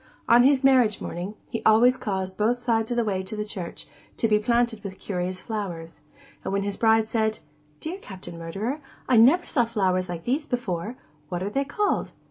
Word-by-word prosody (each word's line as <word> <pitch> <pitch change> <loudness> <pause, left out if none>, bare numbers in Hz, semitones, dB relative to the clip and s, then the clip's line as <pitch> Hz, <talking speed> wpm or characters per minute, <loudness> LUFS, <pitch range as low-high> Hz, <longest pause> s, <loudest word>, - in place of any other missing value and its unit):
On 235 +1 +7
his 270 +1 +4
marriage 255 -6 +4
morning, 180 +5 -5
he 230 - -4
always 235 +4 +6
caused 190 -5 -3
both 220 +5 +1
sides 230 -2 0
of 240 - -1
the 235 - +3
way 195 -4 -1
to 210 +3 -4
church 190 -5 -6 0.3
to 225 - +2
be 210 -1 +3
planted 235 -1 +1
with 190 -2 -7
curious 185 -1 -3
flowers; 175 -8 -5 0.4
and - - -3
when 200 0 0
his 200 0 -2
bride 225 -1 +3
said, 220 -1 0 0.4
'Dear 350 +5 -5
Captain 185 - -9
Murderer, 205 - -4 0.3
I 250 -3 +5
ever 280 +10 +6
saw 245 - +2
flowers 190 -5 0
like 170 -2 -5
these 285 +5 -1
before: 220 -2 -3 0.3
what 175 0 -3
are 200 - -3
they 275 +3 0
called? 405 +9 -1
220 Hz, 190 wpm, -25 LUFS, 190-245 Hz, 0.4 s, On